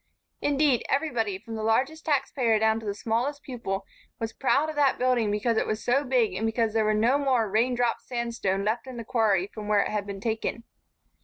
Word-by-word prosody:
Indeed, 285 -4 +2
everybody, 240 -9 0
from 225 +3 -10
the 220 - -4
largest 260 +9 0
tax 275 -3 +1
payer 235 -5 +2
down 220 +1 +2
to 220 - -8
the 200 - -2
smallest 245 +7 -2
pupil, 225 -7 -4 0.3
was 225 0 -4
proud 280 +3 +2
of 310 - -5
that 285 -2 +3
building 250 -4 +2
because 215 +3 0
it - - +1
was 215 0 -2
so 270 +4 +3
big 250 -7 +1
and 190 +4 -3
because 225 -1 0
there 220 -1 +2
was 215 0 +2
no 245 +6 +3
more 255 -6 +2
rain 230 +5 +1
drop 240 -1 0
sandstone 230 -6 -2
left 230 +4 -1
in 255 -2 -7
the 230 - -5
quarry 215 -7 +2
from 210 +1 -9
which 210 -1 +3
it - - -3
had 210 -1 -2
been 200 -1 -6
taken. 225 +2 -2
230 Hz, 220 wpm, -27 LUFS, 215-255 Hz, 0.3 s, that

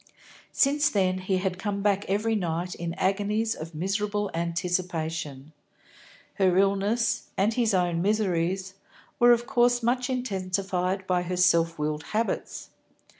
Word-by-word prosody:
Since 290 +2 +3
then, 185 -2 +1
he 185 0 0
had 185 0 -2
come 200 0 -3
back 200 -1 +1
every 215 +3 +1
night 175 -3 -2
in 170 0 -5
agonies 210 +3 0
of 165 -3 -9
miserable 205 +4 -1
anticipation. 165 -4 -3 0.9
Her 185 -2 +3
illness, 200 +4 +1
and 205 +4 +2
his 225 -4 +1
own 175 -2 +1
miseries, 190 -2 0 0.5
were 240 0 +7
of 240 0 +3
course 245 -2 +2
much 250 +2 +1
intensified 190 -5 -2
by 180 -1 +1
her 180 +1 -3
self 170 -2 +3
willed 150 0 -2 0.2
habits. 230 - -3
190 Hz, 130 wpm, -26 LUFS, 175-215 Hz, 0.9 s, were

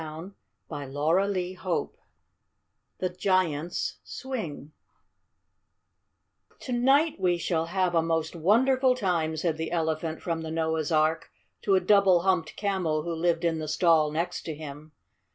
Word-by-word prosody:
THE 160 +4 -8 0.4
TOY 145 -4 -7
PARTY 180 +4 +1
CHAPTER - - -20
I 175 - +1 1.1
THE 185 - -1
GIANT'S 180 -3 -1
SWING 210 - -6 1.9
"To 255 - -6
night 275 +5 +3
we 180 -2 +2
shall 165 -1 -1
have 185 0 0
a 165 - +4
most 165 0 -1
wonderful 255 - +3
time," 170 -8 -1
said 160 0 -1
the 160 0 -4
Elephant 160 -1 -1
from 165 -2 -2
the 160 - -5
Noah's 160 -1 -1
Ark 155 +1 +1 0.3
to 195 - +2
a - - +5
Double 190 -2 +4
Humped 180 -4 0
Camel 180 -7 -1
who 170 +1 -3
lived 170 +1 0
in 165 -1 +1
the 155 - -4
stall 160 -1 +3
next 170 +4 -2
to 160 - -4
him. 150 0 -9
170 Hz, 145 wpm, -27 LUFS, 160-185 Hz, 1.9 s, a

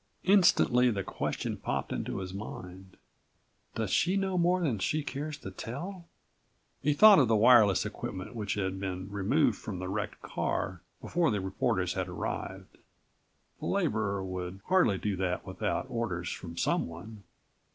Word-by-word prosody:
Instantly 170 -10 +5
the 100 -4 -1
question - - -3
popped - - -3
into - - -3
his 95 -1 -5
mind: 95 -2 -8 0.8
"Does - - -2
she 185 +3 +2
know 190 -1 0
more 180 +1 +3
than 140 - 0
she 150 +10 0
cares 145 +2 -4
to 95 - -8
tell?" 170 - -7 0.7
He 150 +1 +2
thought 205 +3 +8
of 130 - +4
the 110 - +3
wireless 110 -3 +6
equipment 95 +4 -6
which 105 -4 -3
had 95 -2 -2
been 95 0 -4
removed 110 +5 +2
from 100 -4 -6
the 95 +1 -4
wrecked 105 +2 -4
car - - -2 0.2
before 170 -1 +1
the 105 - 0
reporters 95 0 0
had - - -2
arrived. - - -5 0.8
The - - -4
laborer 100 -2 0
would 95 0 -5
hardly 180 - +3
do 105 +1 -2
that 90 -1 -2
without 95 -1 -2
orders 90 -8 -3
from 85 -2 -7
someone. 90 +7 -2
105 Hz, 150 wpm, -30 LUFS, 95-145 Hz, 0.8 s, thought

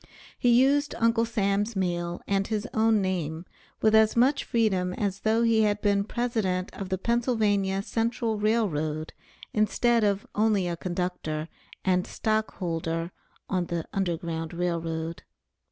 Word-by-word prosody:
He 245 - +3
used 275 +4 +4
Uncle 230 0 +3
Sam's 205 0 0
mail, 175 -2 -2
and 195 0 0
his 215 +1 -2
own 220 -2 +3
name, 170 -3 -2 0.4
with 215 0 +4
as 220 0 +5
much 260 +4 +3
freedom 190 -6 +1
as 200 -2 -2
though 220 +2 +2
he 225 -1 +4
had 205 -1 +2
been 200 -1 +1
President 215 -6 -1
of 195 -2 -6
the 190 - 0
Pennsylvania 205 -4 +1
Central 225 -1 -1
Rail 215 +1 +2
Road, 155 -1 -3 0.4
instead 230 +2 +2
of 200 -1 +1
only 210 -4 +2
a 170 - -2
conductor 175 -3 -3 0.4
and 180 -1 +2
stock 220 0 -1
holder 165 -1 -2 0.4
on 180 -3 -1
the 170 -2 -3
Underground 170 -3 -2
Rail 175 -1 -1
Road. 165 0 -4
200 Hz, 145 wpm, -27 LUFS, 175-220 Hz, 0.4 s, as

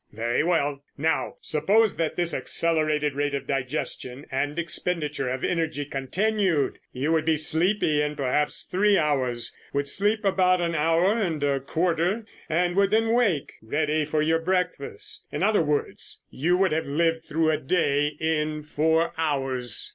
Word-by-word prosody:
"Very 115 +2 0
well. 145 -5 0 0.2
Now 160 +3 0
suppose 200 +8 +2
that 165 -2 -1
this 175 -1 0
accelerated 155 -3 +1
rate 145 0 -1
of 140 - -4
digestion 130 0 -3
and 145 +3 -1
expenditure 160 -5 -2
of 130 +1 -3
energy 160 -4 -1
continued. 170 - 0
You 140 +5 -1
would 160 -1 +2
be 160 -1 +3
sleepy 160 0 +2
in 150 0 -1
perhaps 145 +1 0
three 200 +2 +2
hours, 130 -6 0 0.2
would 140 0 0
sleep 210 +6 +1
about 185 -2 +3
an 170 -1 -1
hour 165 +8 +2
and 160 -7 -1
a 140 -1 +1
quarter, 175 - 0 0.2
and 175 +2 +1
would 200 -1 +4
then 225 +2 +2
wake, 205 - +1
ready 150 +6 0
for 150 +1 0
your 165 +1 +2
breakfast. 180 -4 -3
In - - -2
other 210 -1 +3
words, 150 -2 -2
you 175 +7 +1
would 190 -2 +2
have 160 0 -1
lived 165 +2 0
through 160 +1 +1
a 155 - +1
day 145 -1 +1
in 155 -1 -1
four 160 +2 +1
hours." 135 -6 0
155 Hz, 155 wpm, -25 LUFS, 145-175 Hz, 0.2 s, would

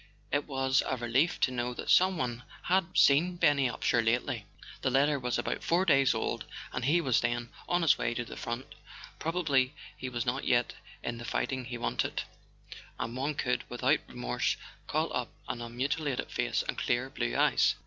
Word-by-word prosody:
It 145 +1 0
was 135 -1 +2
a 130 - -1
relief 125 +8 +1
to 130 - +3
know 120 0 -2
that - - -2
someone 160 -11 +3 0.2
had 185 0 +1
seen 165 +6 +5
Benny 140 -6 +3
Upsher 120 -1 +1
lately. 115 -1 0 0.3
The 130 - +1
letter 140 +2 +3
was 125 -1 -1
but - - -2
four 175 +3 +2
days 135 -6 +4
old, 110 - -2 0.3
and 125 - -2
he 160 +6 +4
was 130 -7 +2
then 120 0 -1 0.2
on 175 0 +2
his 165 - +4
way 120 - 0
to 120 - -2
the - - -9
front. 120 +3 -4 0.5
Probably 150 -5 +1 0.2
he 130 - -5
was 120 -2 -2
not 130 +2 -1
yet 120 0 +2 0.3
in 120 -1 -3
the - - -7
fighting 130 +2 -2
he 120 0 -5
wanted, 120 - -1 0.7
and 115 +1 -4
one 140 +3 -1
could, 125 -4 0
without 120 - +2
re¬ - - -14
morse, - - 0 0.3
call - - 0
up - - -1 0.2
an 120 - -4
unmutilated 135 +4 -2
face - - 0
and - - -2
clear 120 +2 +1
blue - - -2
eyes. - - +4
130 Hz, 185 wpm, -30 LUFS, 120-145 Hz, 0.7 s, seen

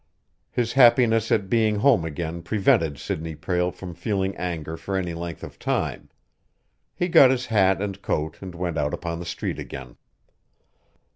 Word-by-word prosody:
His 120 -1 -1
happiness 120 -3 +5
at 95 - +2
being 110 0 +2
home 110 -3 +4
again 80 +2 -4
prevented 85 -5 +2
Sidney 80 +2 -4
Prale 90 +3 0
from 90 -1 -9
feeling 95 +2 -2
anger 80 -3 -4
for 95 +4 -3
any 90 -3 -2
length 85 -1 -6
of - - -10
time. - - -2 0.9
He 175 - 0
got 165 -7 +7
his 130 -1 0
hat 95 -3 +2
and 100 -1 -5
coat 75 +1 -2
and 95 -2 -8
went 85 -2 -2
out 75 0 0
upon 85 -1 -5
the 85 - -7
street - - -4
again. 65 -3 -8
90 Hz, 160 wpm, -24 LUFS, 85-110 Hz, 0.9 s, got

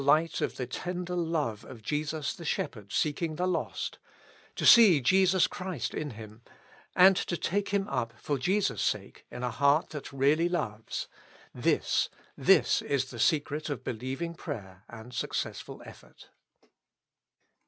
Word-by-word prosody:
light 155 +4 +3
of - - -1
the 125 - -2
tender 180 +7 -4
love 160 -10 -1
of 115 -4 -12
Jesus 150 +3 -2
the 170 - -10
Shepherd 105 -9 -3
seeking 155 +1 0
the 180 - -1
lost; 180 -2 -3 0.6
to - - -2
see 215 -10 +8
Jesus 185 +6 +4
Christ 180 -10 -4
in 150 - -3
him, 110 0 -11 0.5
and 190 +1 +7
to 175 - -2
take 200 +5 -1
him 200 0 0
up, 115 - -2
for 145 -2 -2
Jesus' 190 +9 +1
sake, - - -3
in 125 - -7
a 125 - -1
heart 140 +6 +3
that 150 -3 -7
really 145 +5 +2
loves, 115 -11 -3 0.3
— - - -25
this, - - +2 0.3
this - - +4
is 135 -2 -1
the 120 - -8
secret 150 +3 +1
of 145 - -4
beHeving 130 +8 -4
prayer 95 - -8
and 115 +2 -11
successful 120 - -4
effort. - - -15
150 Hz, 150 wpm, -29 LUFS, 125-175 Hz, 0.6 s, see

